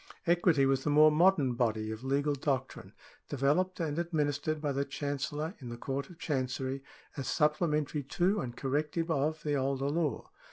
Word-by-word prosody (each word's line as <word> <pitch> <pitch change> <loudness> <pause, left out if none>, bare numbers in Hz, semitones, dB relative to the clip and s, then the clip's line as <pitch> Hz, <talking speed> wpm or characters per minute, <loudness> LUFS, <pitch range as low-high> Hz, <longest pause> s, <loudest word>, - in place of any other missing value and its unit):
Equity 170 -5 +4
was 135 0 +2
the - - 0
more 155 +1 +7
modern 155 -5 +4
body 110 -3 0
of 110 +2 -7
legal 140 +2 +1
doctrine, 135 -1 -3 0.4
developed 150 +8 +1
and 160 -1 -1
administered 155 -2 -1
by 150 -1 -1
the 140 +1 0
Chancellor 145 +3 -3
in 125 -4 -8
the 120 - -6
Court 135 +3 -4
of 175 - -13
Chancery 135 -3 -2 0.4
as 135 - -3
supplementary 150 -1 +1
to, 180 +9 +1
and 120 -2 -6
corrective 150 +5 -1
of, 155 +1 0
the 150 - 0
older 135 0 0
law. 160 -2 -1
145 Hz, 165 wpm, -31 LUFS, 135-155 Hz, 0.4 s, more